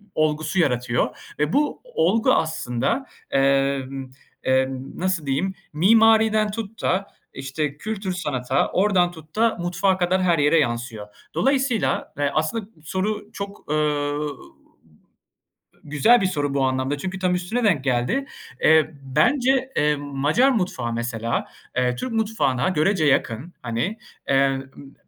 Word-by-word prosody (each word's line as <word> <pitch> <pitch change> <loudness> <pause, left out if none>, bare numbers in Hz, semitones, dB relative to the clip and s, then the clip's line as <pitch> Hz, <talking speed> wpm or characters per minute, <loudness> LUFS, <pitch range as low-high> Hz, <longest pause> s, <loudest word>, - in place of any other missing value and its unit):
olgusu 155 +3 0
yaratıyor. 125 -3 -1
Ve 150 +2 0
bu 295 +1 +1
o 485 -1 0
olgu 225 0 +3
aslında, 160 - -1 0.3
emm, 135 -1 +1 0.3
emm, 130 +1 -1
nasıl 185 -4 -1
diyeyim 150 +8 0 0.2
mimariden 220 +3 +4
tut 225 0 -6
da 195 +2 0 0.3
işte 140 +2 -3
kültür 205 0 -4
sanata 130 -7 -1
oradan 185 -3 +3
tut 160 0 -15
da 225 +1 +2
mutfağa 180 +2 +1
kadar 185 +1 +1
her 170 -3 +3
yere 150 +3 +4
yansıyor. 120 -5 -2 0.3
Dolayısıyla, 270 -4 0
eee, 145 -1 +1
aslında 160 +8 -1 0.2
soru 205 +5 -3
çok, 200 0 -7
eee, 150 -1 +1 1.7
güzel 195 - +4
bir - - +1
soru 145 -6 -1
bu 140 -1 +1
anlamda, 130 +2 -1
çünkü 190 +5 -5
tam 180 -1 +1
üstüne 200 +8 -2
denk 170 -11 +2
geldi. 130 - 0 0.4
Eee, 160 0 +5 0.2
bence, 265 0 +3
eee, 150 0 +3
Macar 145 - +1
mutfağı 180 - -1
mesela, 115 -1 -2 0.3
eee, 125 -1 +1
Türk 245 - -4
mutfağına 210 - 0
görece 175 0 +2
yakın 140 +3 0
hani, 125 - -2 0.3
eee, 135 0 +4
ımm 135 - -3
ı, 135 +1 -14
155 Hz, 135 wpm, -23 LUFS, 135-205 Hz, 1.7 s, Eee